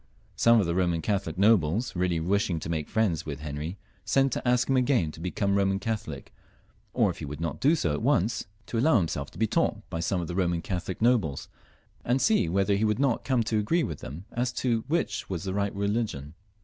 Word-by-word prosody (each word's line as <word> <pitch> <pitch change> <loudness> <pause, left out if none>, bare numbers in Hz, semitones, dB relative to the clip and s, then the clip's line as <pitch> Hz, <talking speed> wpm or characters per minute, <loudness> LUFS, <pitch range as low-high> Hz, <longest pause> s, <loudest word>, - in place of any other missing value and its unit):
Some 115 0 +5
of 100 - +2
the 85 - -1
Boman 85 -2 0
Catholic 95 -5 -1
nobles, 100 +1 +3
really 90 -2 0
wishing 90 0 0
to - - -5
make 80 -3 -3
friends 95 -8 +1
with 75 -1 -6
Henry, 75 +4 -5 0.3
sent 135 0 +2
to - - -3
ask 125 0 +3
him 135 - +2
again 125 - +2
to 80 - -13
become 90 +3 -1
a - - +2
Boman 95 0 +1
Catholic, 110 0 -5 0.6
or, - - +2
if - - -11
he - - -5
would 75 +1 -7
not 80 -2 -3
do 150 +5 +4
so 85 - 0
at 75 - -3
once, 100 +6 +1 0.2
to 115 - -2
allow 135 +1 +4
himself 75 -6 -2
to - - -15
be 110 - +2
taught - - 0
by 80 - -3
some 85 +3 0
of 85 - -3
the 90 - -4
Boman 85 -2 0
Catholic 90 +3 -4
nobles, 110 - +1 0.5
and 125 +3 +1
see 210 - +3
whether 100 +3 +2
he 100 - 0
would 105 -1 +2
not 135 -3 +1
come 130 -4 +1
to 110 0 0
agree 165 +11 +1
with 80 -4 -4
them 80 +8 -8
as 120 +1 -1
to 120 -3 0
which 170 +4 -1
was 90 -4 -3
the 95 -1 -3
right 100 0 -1
religion. 100 -8 -2
100 Hz, 225 wpm, -27 LUFS, 85-115 Hz, 0.6 s, Some